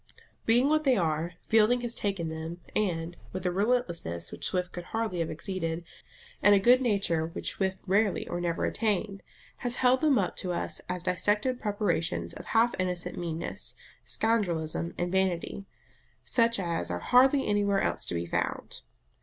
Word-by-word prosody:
Being 240 +4 +5
what 310 +1 +2
they 265 -4 +4
are, 165 -1 0
Fielding 225 +3 +4
has 240 -1 -3
taken 195 -7 -2
them, 160 +2 -6 0.2
and, 175 -4 -1 0.2
with 185 0 -5
a 180 - +2
relentlessness 175 - -1
which - - -3
Swift 180 -1 -1
could 175 -1 -7
hardly 225 -5 -2
have 165 - -1
exceeded, 165 0 -3 0.6
and 205 +1 +7
a - - +5
good 245 +6 +5
nature 195 -9 +1
which 165 - -3
Swift 190 -1 -1
rarely 200 +1 +1
or 175 - -3
never 170 -1 0
attained, 205 -2 -1 0.4
has 245 -1 -1
held 255 +1 +3
them 300 -4 +4
up 190 -4 0
to 180 -1 -2
us - - -2
as 180 -1 -3
dissected 205 +7 +1
preparations 170 - -1
of - - -9
half 235 +1 +3
innocent 180 -1 -2
meanness, 170 -1 -4 0.3
scoundrelism, 170 -7 0
and 175 0 -1
vanity, 190 +1 -1 0.6
such 230 -2 +3
as 170 -3 -2
are 90 - -1
hardly 265 - +4
anywhere 205 -1 +2
else - - 0
to - - -2
be 85 0 -2
found. 85 - -3
190 Hz, 165 wpm, -29 LUFS, 170-225 Hz, 0.6 s, and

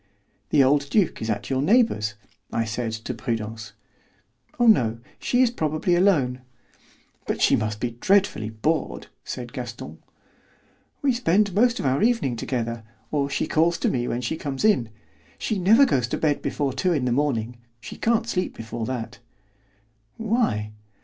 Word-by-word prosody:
"The 145 -3 +5
old 140 +1 +2
duke 200 -1 +1
is 110 - -3
at 105 +2 -3
your 130 0 +1
neighbour's," 145 - +2 0.4
I 115 - 0
said 110 +1 -3
to 110 +3 -5
Prudence. 110 -2 -4 0.9
"Oh, 240 - +4
no; 120 - +4 0.2
she 250 +1 +2
is 240 - +2
probably 155 -3 0
alone." 145 -10 +2 0.9
"But - - -1
she - - +4
must 105 -1 -2
be 120 0 -2
dreadfully 185 - +1
bored," 130 +9 -2
said - - -6
Gaston. - - -7 1.0
"We 275 -2 +3
spend 205 -4 +2
most 240 +4 +3
of - - -3
our 135 +1 +1
evening 230 - +2
together, 115 -1 -3 0.3
or 140 -2 0
she - - -1
calls 165 +2 +2
to - - 0
me 120 -1 -1
when 120 - -2
she 125 +6 -2
comes 140 +4 -3
in. 165 - +3 0.5
She 215 -4 -2
never 220 +10 +6
goes 125 - +1
to - - -2
bed 150 -2 +1
before 140 -3 -1
two 175 +7 +1
in 140 -6 0
the 125 - 0
morning. 120 -3 0 0.2
She 105 - -9
can't 230 0 +1
sleep 185 -5 -2
before 115 0 -5
that." 125 -3 -5 1.0
"Why?" 220 - 0
135 Hz, 165 wpm, -24 LUFS, -, 1.0 s, never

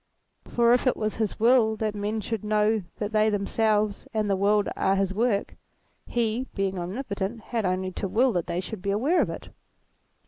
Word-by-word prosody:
For 235 0 +3
if 250 +2 +2
it 255 - +2
was 215 -1 -2
his 220 -3 -2
will 230 -1 +4
that 215 -1 -2
men 210 +1 -2
should 220 0 -4
know 215 +1 +2 0.2
that 210 0 -3
they 215 0 +3
themselves 210 0 0
and 215 -1 +1
the 200 - +2
world 205 +1 +2
are 195 - +2
his 195 -1 0
work, 215 -1 0 0.5
he, 235 +2 -1
being 195 -2 -1
omnipotent, 200 +2 -4
had 225 -2 -2
only 185 +1 -1
to 195 - -3
will 240 +6 +2
that 175 -3 -1
they 175 - -1
should 195 +1 -7
be 200 - -3
aware 265 - +2
of - - 0
it. - - -7
215 Hz, 195 wpm, -26 LUFS, 195-225 Hz, 0.5 s, will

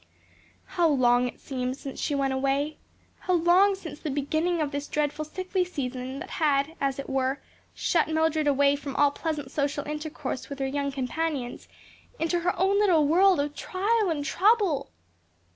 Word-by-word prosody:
How 345 -2 +1
long 250 -3 +3
it 245 - -8
seemed 255 -1 -3
since 275 -2 -8
she 290 - -1
went 270 -1 0
away! 275 +3 -1 0.4
how 365 - -1
long 360 +4 +4
since 325 -6 -9
the 310 - -4
beginning 315 +5 0
of 300 -2 -1
this 285 0 -4
dreadful 300 0 -1
sickly 370 +4 -2
season 260 -6 -4
that - - -7
had, 285 0 +2
as 275 -1 0
it 275 - -6
were, 270 +1 0 0.4
shut 335 -3 +1
her 315 - -4
(Mildred) 315 -1 +1
away 285 0 +4
from 280 -1 -6
all 290 -1 +4
pleasant 290 -3 -4
social 285 0 -1
intercourse 300 -3 -5
with 280 - -6
her 270 - -2
young 280 +1 -1
companions 270 0 -3 0.5
into 335 +2 0
her 355 +1 -1
own 390 +2 +3
little 350 -8 +4
world 365 +2 +5
of 290 +1 -1
trial 405 +6 0
and 295 -3 -2
trouble! 395 - +2
295 Hz, 175 wpm, -27 LUFS, 275-335 Hz, 0.5 s, world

